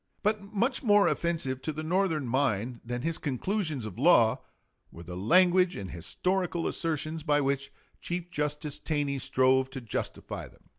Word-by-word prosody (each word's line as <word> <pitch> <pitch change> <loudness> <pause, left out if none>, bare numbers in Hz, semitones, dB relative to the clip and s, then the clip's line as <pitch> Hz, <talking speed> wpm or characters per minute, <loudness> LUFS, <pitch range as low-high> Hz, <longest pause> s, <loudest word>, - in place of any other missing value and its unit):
But 210 0 +1
much 205 +6 0
more 205 -5 +5
offensive 155 -7 -1
to 155 - -2
the 155 +1 -5
Northern 165 -3 +1
mind 120 -2 0
than 120 +1 -4
his 165 0 -1
conclusions 155 - -2
of 110 +1 -7
law 125 -6 +5 0.5
were 85 - -11
the 90 +1 -8
language 180 - +4
and 95 -2 -6
historical 180 - -1
assertions 160 -1 -2
by 145 -1 +2
which 140 0 -1 0.3
Chief 175 0 -4
Justice 150 0 -2
Taney 145 -3 -1
strove 130 +1 +2
to 135 0 -6
justify 115 -4 -5
them. - - -21
150 Hz, 155 wpm, -29 LUFS, 130-175 Hz, 0.5 s, more